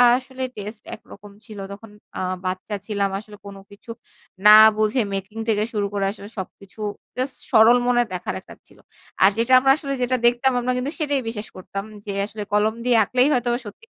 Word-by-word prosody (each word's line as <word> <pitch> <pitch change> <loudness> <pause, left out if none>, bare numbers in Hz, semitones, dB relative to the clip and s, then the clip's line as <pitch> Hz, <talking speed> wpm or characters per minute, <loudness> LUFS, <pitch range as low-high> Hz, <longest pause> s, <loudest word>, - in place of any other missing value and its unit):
আসলে 260 0 -5
টেস্ট 210 +2 -7
একরকম 205 -1 -15
ছিল। 215 -3 -10
তখন 210 +2 -10 0.3
আ - - -3 0.3
বাচ্চা 185 +3 -3
ছিলাম, 200 -2 0
আসলে 210 0 -13
কোন 200 0 -9 0.2
কিছু 200 +3 -17 0.6
না - - +10 0.3
বুঝে 215 +4 +2
মেকিং 195 +3 -5
থেকে 210 -1 +2
শুরু 205 -2 0
করে 200 -1 0
আসলে 200 0 -11
সবকিছু 190 +2 -9 0.4
জাস্ট 255 +1 -2 0.2
সরল 225 +3 +7
মনে 240 -1 +3
দেখার 180 - -4
একটা - - -14
ছিল। - - -21 0.5
আর 190 - +8
যেটা 235 +3 +1
আমরা 270 +1 +4
আসলে 280 -3 -4
যেটা 250 +1 +1
দেখতাম 240 +2 +3
আমরা 245 +1 -1
কিন্তু 255 +3 -2
সেটাই 290 -3 0
বিশ্বাস 220 -1 -5
করতাম 195 +1 -6 0.2
যে 205 - -4
আসলে 210 0 -7
কলম 210 +1 +2
দিয়ে 245 -2 +4
আঁকলেই 250 +5 +2
হয়তোবা 240 -1 0
সত্যি 210 - -11
220 Hz, 185 wpm, -22 LUFS, 205-250 Hz, 0.6 s, না